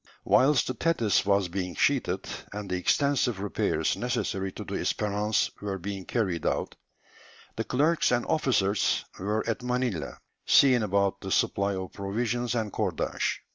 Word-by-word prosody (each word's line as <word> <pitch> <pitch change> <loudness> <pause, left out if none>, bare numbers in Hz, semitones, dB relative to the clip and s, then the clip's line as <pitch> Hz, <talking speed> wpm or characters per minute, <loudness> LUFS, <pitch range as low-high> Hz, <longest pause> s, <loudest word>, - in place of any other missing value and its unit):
Whilst 135 -1 +4
the 130 - -2
Thetis 120 -8 +1
was 100 -2 +3
being 90 -1 -4
sheathed, - - +1 0.2
and 105 0 -6
the 90 - -2
extensive 125 +3 +1
repairs 100 0 0
necessary 95 0 -2
to - - -7
the - - -7
Espérance 105 +1 0
were 100 -1 -3
being 95 0 -6
carried 95 -9 -1
out, - - -1 0.8
the - - -2
clerks 155 +6 +2
and 120 -1 +1
officers 105 -9 +1
were 105 +4 -1
at 115 - -1
Manilla, 125 -8 -2 0.3
seeing 130 -4 +5
about 100 -1 0
the 95 - -5
supply 100 +1 +1
of 95 -1 -6
provisions 120 +5 -2
and 110 -3 -1
cordage. - - -1
105 Hz, 145 wpm, -27 LUFS, 95-120 Hz, 0.8 s, seeing